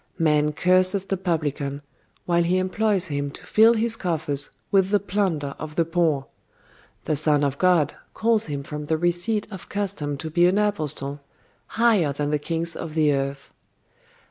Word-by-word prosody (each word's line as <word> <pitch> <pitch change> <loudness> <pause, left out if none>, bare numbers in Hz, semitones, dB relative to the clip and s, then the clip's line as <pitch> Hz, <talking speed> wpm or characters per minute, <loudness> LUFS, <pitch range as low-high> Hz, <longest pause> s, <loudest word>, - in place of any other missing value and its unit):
Man 150 -3 +2
curses 185 +3 +3
the 195 - -1
publican, 150 -6 -2 0.4
while 170 -1 +2
he 175 +2 +1
employs 185 +1 +1
him 145 -3 -3
to - - -12
fill 225 +2 +5
his 225 +1 +2
coffers 155 -7 -1 0.2
with 195 -1 +3
the 205 0 +3
plunder 185 -9 -1
of 155 0 -7
the 165 - +2
poor: 165 -5 0 0.8
The 155 - 0
Son 145 0 +3
of 140 0 -1
God 180 -5 +3 0.2
calls 225 -3 +2
him 140 -2 -4
from 150 +1 -6
the 160 +1 +1
receipt 175 +6 0
of 190 -3 -9
custom 190 -8 -2
to 160 +3 -6
be 175 +2 +4
an 185 +3 +2
apostle, 150 -9 -2 0.6
higher 215 -11 +3
than 145 +1 -2
the 150 - +1
kings 165 +2 -2
of 155 -1 -6
the 155 -2 +3
earth. 140 0 -4
165 Hz, 170 wpm, -24 LUFS, 145-190 Hz, 0.8 s, fill